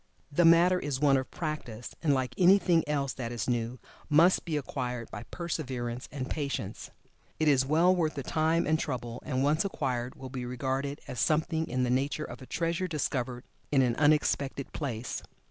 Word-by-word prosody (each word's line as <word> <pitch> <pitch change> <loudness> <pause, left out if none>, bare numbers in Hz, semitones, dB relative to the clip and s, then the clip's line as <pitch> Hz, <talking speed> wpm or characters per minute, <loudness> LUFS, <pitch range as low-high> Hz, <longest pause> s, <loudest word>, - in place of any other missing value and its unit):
The 170 +4 +3
matter 175 +2 +6
is 145 -5 -2
one 140 -1 +4
of 130 - -3
practice, 145 -8 -5
and, 155 - +2
like 130 -2 0
anything 180 -3 +5
else 140 -3 0
that 120 -2 -5
is 115 -5 -3
new, 120 0 -1 0.3
must 165 +5 +5
be 160 -3 -1
acquired 125 -4 -4
by - - -7
perseverance 130 -8 -4
and 130 -3 -4
patience. 140 -9 -4 0.5
It 155 - +2
is 135 -2 +4
well 170 +5 +4
worth 160 -3 0
the 140 - -4
time 160 +3 +1
and 155 +1 +2
trouble, 120 -5 -4
and 130 -2 -1
once 150 +3 +3
acquired 130 -10 -2
will 130 -1 -9
be 130 -2 -4
regarded 130 +3 -2
as 125 - -5
something 160 +1 +1
in 125 +1 0
the 125 - +1
nature 140 +4 0
of - - -9
a 130 - -10
treasure 170 +2 -1
discovered 130 -6 -2 0.3
in 135 -2 +4
an 120 -2 +1
unexpected 145 -2 +1
place. 125 -5 -4
140 Hz, 180 wpm, -29 LUFS, 125-155 Hz, 0.5 s, matter